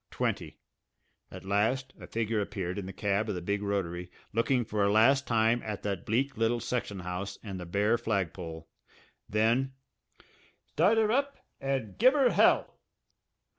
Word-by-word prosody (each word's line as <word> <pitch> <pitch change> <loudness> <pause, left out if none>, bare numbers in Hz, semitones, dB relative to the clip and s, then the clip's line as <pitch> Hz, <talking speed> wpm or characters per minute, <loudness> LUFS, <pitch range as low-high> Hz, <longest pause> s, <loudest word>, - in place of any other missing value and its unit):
Twenty. - - -2 0.7
At - - -10
last 115 +7 0
a - - -10
figure 115 -1 -1
appeared 95 -1 -3
in 95 - -6
the - - -5
cab 105 +2 -1
of 105 - -1
the 90 - -4
big 100 +2 -1
rotary, 90 -3 -2 0.2
looking 120 +2 +2
for 105 -1 0
a 100 - +3
last 135 +6 +4
time 115 +1 +3
at 105 -2 -5
that 100 -4 -3
bleak 135 +6 0
little 115 +1 +1
section 115 -5 -3
house 90 +2 -5
and 100 -4 -6
the 90 - -7
bare 105 +6 +2
flagpole. 90 -7 -3 0.6
Then: 115 +5 +2 1.0
"Start 195 +8 +3
'er 220 -1 +3
up 280 +3 0 0.2
and 135 -6 -3
give 255 +6 +6
'er 270 -4 +4
hell!" - - +3
110 Hz, 160 wpm, -30 LUFS, 100-125 Hz, 1.0 s, give